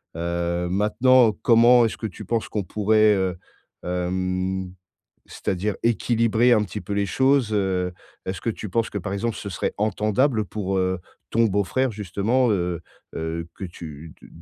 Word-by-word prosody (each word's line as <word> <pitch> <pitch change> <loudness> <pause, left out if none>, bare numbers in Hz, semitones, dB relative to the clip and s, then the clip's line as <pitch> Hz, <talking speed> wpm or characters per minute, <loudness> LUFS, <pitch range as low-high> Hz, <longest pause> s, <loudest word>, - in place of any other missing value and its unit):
Heu, 85 +1 -2
maintenant 110 +5 +4
comment 120 +1 +6
est-ce 110 - -3
que 110 - -3
tu 105 +1 -10
penses 115 +3 -1
qu'on 105 - -2
pourrait, 110 +2 +3
heu, 95 -2 0 0.5
hem, 90 +1 -2 0.6
c'est-à-dire 100 +2 -2
équilibrer 115 +1 +2
un 110 -3 +4
petit 105 +1 -6
peu 100 - -6
les 100 0 +1
choses, 130 +2 +2
heu, 95 -3 0 0.3
est-ce 95 -1 -4
que 115 - -1
tu 110 -1 -6
penses 115 +3 0
que, 100 - -3
par 95 +1 -5
exemple, 110 +3 -2
ce 100 - -6
serait 95 - -2
entendable 110 +3 +1
pour, 95 -1 -3
heu, 95 0 0 0.3
ton 115 +1 +3
beau-frère 105 +6 0
justement, 110 +5 0
heu 90 -3 -1 0.4
heu, 80 +1 -4
que - - -7
tu 80 -3 -9
de - - -14
100 Hz, 160 wpm, -23 LUFS, 90-115 Hz, 0.6 s, comment